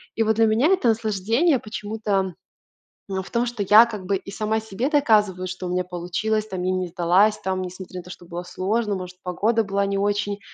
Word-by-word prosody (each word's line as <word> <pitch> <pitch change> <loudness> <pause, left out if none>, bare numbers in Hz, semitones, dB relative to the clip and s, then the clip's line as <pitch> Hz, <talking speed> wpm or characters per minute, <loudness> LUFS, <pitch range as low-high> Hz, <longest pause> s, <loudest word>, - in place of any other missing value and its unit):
И, 225 - +2
вот, 220 0 +2
для 225 - +5
меня 220 +6 +3
это 365 -9 +3
наслаждение, 225 - +1
почему-то, 205 -4 -2 0.7
ну, 190 -1 -2
в - - -12
том, 235 0 +1
что 235 -4 -3
я, 210 +4 +8
как 210 -5 -7
бы, 195 +1 +1
и 195 - -10
сама 215 +1 -1
себе 220 +4 -3
доказываю, 210 - +2
что 185 0 -5
у - - -4
меня 180 0 0
получилось, 200 +5 -2
там, 185 -3 -4
я 185 - +1
не 185 -1 -1
сдалась, 180 +5 +3
там, 190 0 -2
несмотря 185 0 -7
на - - -9
то, 180 - -14
что 175 - -11
было 175 0 -6
сложно, 205 +4 -1
может 180 -1 -7
погода 220 +6 +1
была 200 -1 0
не 200 0 -1
очень, 205 0 -1
200 Hz, 215 wpm, -23 LUFS, 185-220 Hz, 0.7 s, я